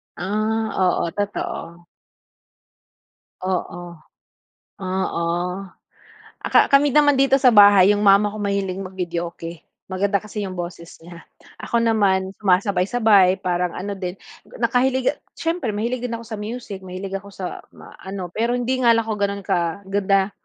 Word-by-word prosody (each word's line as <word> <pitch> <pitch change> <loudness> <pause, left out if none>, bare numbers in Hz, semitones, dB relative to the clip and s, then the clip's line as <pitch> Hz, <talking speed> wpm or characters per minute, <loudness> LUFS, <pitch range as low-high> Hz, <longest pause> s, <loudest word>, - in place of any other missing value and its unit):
Ah. 215 +4 -1
Oo, 180 -2 +1
totoo. 175 -4 -5 1.6
Oo. 175 -1 -3 0.9
Oo. 185 -2 -2 1.2
Ah, - - -1
ka - - +6
kami 280 +1 +5
naman 290 -1 +5
dito 270 0 +4
sa 255 -2 +5
bahay 205 -2 +7
yung 205 - +1
mama 200 +1 +5
ko 215 - -8
mahilig 200 -2 -2
mag-videoke, 175 -3 -5 0.3
maganda 200 +2 +1
kasi 210 0 -5
yung 185 - -7
boses 175 -1 -7
niya. 170 0 -13 0.3
Ako 235 -1 0
naman, 195 -4 +2
sumasabay-sabay 195 0 +3
parang 180 -1 -1
ano 200 +2 -4
din, 180 -1 -4 0.4
nakahiliga 260 +2 +1 0.2
siyempre 330 -8 -2
mahilig 235 +4 -2
din 235 - -4
ako 230 - -8
sa 220 -2 -6
music, 210 -2 -6
mahilig 190 +1 -6
ako 200 +1 -14
sa 185 -2 -5 0.2
ma - - -14
ano, 190 -2 -6
pero 235 +5 0
hindi 250 +1 -1
nga 240 -2 +5
lang 230 - +1
ako 220 - -1
ganun 200 0 -1
kaganda 195 +3 0
200 Hz, 140 wpm, -21 LUFS, 185-225 Hz, 1.6 s, bahay